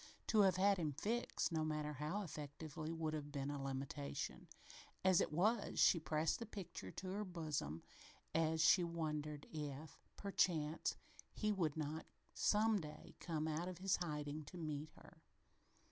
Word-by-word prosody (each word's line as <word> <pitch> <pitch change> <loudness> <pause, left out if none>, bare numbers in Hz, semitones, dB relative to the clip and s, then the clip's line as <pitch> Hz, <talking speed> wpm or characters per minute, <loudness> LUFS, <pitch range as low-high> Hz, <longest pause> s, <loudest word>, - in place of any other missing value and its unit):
To 220 - +3
have 190 -2 +6
had 195 +1 +5
him 155 -4 0
fixed, 230 - 0
no 160 -1 +1
matter 150 -1 -1
how 155 +8 -2
effectively, 155 0 -5
would 160 -1 -1
have 145 -1 -4
been 140 0 -2
a 145 -1 -3
limitation. 135 +1 -3 0.6
As 185 -2 +6
it - - 0
was, 205 +8 +2
she 170 - +7
pressed 155 0 +1
the 230 - -5
picture 175 - -6
to 185 - -6
her 200 +3 -1
bosom 155 - -3 0.5
as 160 0 +3
she 175 +2 +7
wondered 150 -3 -2
if, 150 -1 -5 0.2
perchance, 165 -6 +1 0.4
he 215 -1 +1
would 165 -7 +1
not 155 +1 -3 0.3
some 215 0 +4
day 150 -1 -9
come 160 -2 -1
out 160 +3 -1
of 185 -1 -5
his 190 +1 +2
hiding 150 -3 -3
to 180 - -9
meet 155 -2 -3
her. - - -16
160 Hz, 160 wpm, -41 LUFS, 150-180 Hz, 0.6 s, she